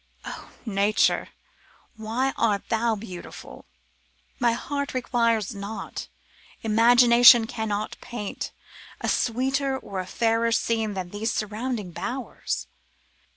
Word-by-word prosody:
'O - - -8 0.2
Nature! 205 -1 +2 0.7
why 230 +5 -1
art 210 -4 0
thou 225 0 +1
beautiful? 190 -4 -9 0.7
My 240 -2 +3
heart 280 +3 -3
requires 230 -4 +1
not, 200 +2 -6 0.6
imagination 235 +1 +7
cannot 215 -2 -3
paint, 215 -4 -5 0.5
a - - -3
sweeter 265 +3 +1
or 195 -6 -6
a 185 - -4
fairer 230 +2 +1
scene 225 -2 0
than 180 -2 -4
these 220 +2 -2
surrounding 215 -2 -3
bowers. 250 +8 -4
225 Hz, 105 wpm, -25 LUFS, 210-240 Hz, 0.7 s, imagination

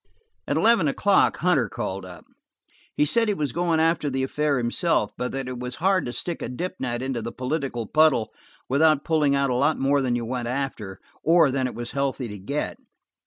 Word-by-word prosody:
At - - 0
eleven 225 -8 +4
o'clock 195 +8 +3
Hunter 145 - +2
called 95 0 -4
up; 90 -1 -12 0.7
he 150 - +3
said 230 +9 +2
he 205 - +1
was 150 -6 -2
going 170 0 +1
after 160 -2 +2
the 135 0 -1
affair 150 +1 0
himself, 120 - 0
but 125 - -3
that 135 -1 -4
it 125 -1 -5
was 125 0 -5
hard 190 -2 +1
to - - -3
stick 170 +6 -4
a - - -4
dip 180 +9 -4
net 120 -1 -2
into 130 -3 -2
the 115 +1 -5
political 130 -3 -3
puddle 150 -3 +3 0.3
without 155 +2 +3
pulling 150 -4 +2
out 140 -1 +1
a - - +1
lot 140 +5 +2
more 140 +1 +2
than 125 -2 0
you 120 -1 -2
went 120 0 -3
after, 120 -7 -4 0.2
or 165 -3 +4
than 130 -1 0
it 125 - -7
was 120 0 -6
healthy 140 -2 -2
to 105 -1 -8
get. 140 +11 -3
135 Hz, 210 wpm, -24 LUFS, 120-160 Hz, 0.7 s, eleven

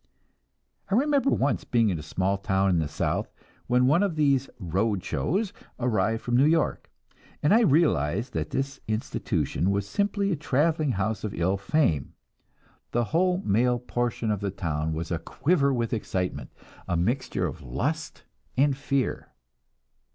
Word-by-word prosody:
I 195 - +2
remember 280 +2 +3
once 140 - +1
being 115 -3 +2
in 85 - -2
a - - -5
small 95 +6 -1
town 95 -1 +1
in 85 - +2
the 80 - 0
South, 80 +2 -2 0.4
when 125 0 +3
one 150 +8 +4
of 200 -5 0
these 140 -3 +2
"road 95 +1 -1
shows" 195 +5 -1 0.3
arrived 115 -2 0
from 120 - 0
New 135 +3 +5
York, 160 0 +1 0.5
and 150 - +4
I 225 - +7
realized 130 - +2
that - - -2
this 135 +1 -3
institution 110 -3 -1
was 100 0 0
simply 200 - 0
a - - +2
traveling 150 0 +1
house 100 +1 -2
of 105 - -3
ill 90 +3 +1
fame; 100 - 0 0.8
the 120 - +1
whole 180 +2 +2
male 120 +4 +3
portion 120 -2 -2
of 105 - -1
the 100 0 -2
town 80 -5 -2
was 80 +2 -4
a 85 - 0
quiver 140 - +1
with 120 -3 -1
excitement, 95 -4 -3 0.4
a 90 - 0
mixture 120 +10 0
of - - -5
lust - - -3 0.3
and 140 +1 +3
fear. 140 -1 -1
120 Hz, 160 wpm, -26 LUFS, 95-145 Hz, 0.8 s, I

